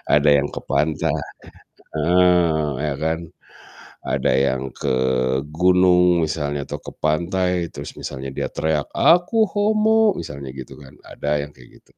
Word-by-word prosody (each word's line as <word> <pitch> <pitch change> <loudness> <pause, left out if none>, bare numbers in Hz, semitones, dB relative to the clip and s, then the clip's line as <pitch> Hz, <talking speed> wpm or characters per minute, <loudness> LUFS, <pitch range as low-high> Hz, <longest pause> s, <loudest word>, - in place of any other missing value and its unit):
ada 75 0 +4
yang 70 -1 +3
ke - - -6
pantai. 75 +1 0 0.9
Heeh, 85 -1 +3 0.2
ya 75 - -1
kan? 80 +1 0 0.8
Ada - - 0
yang 65 -1 +1
ke 65 - -2 0.6
gunung 90 0 +4
misalnya 75 -2 -2
atau - - -6
ke - - -19
pantai 85 +3 0
terus 70 0 -8
misalnya 65 +1 -6
dia - - -3
teriak 80 -2 -2
"Aku 180 +7 +4
homo," 215 +1 +2
misalnya 70 -2 -7
gitu 65 -2 -9
kan, 70 -2 -15
ada 75 0 -2
yang 75 - -10
kayak 60 -1 -17 0.2
gitu. - - -28
80 Hz, 140 wpm, -21 LUFS, 70-90 Hz, 0.9 s, ada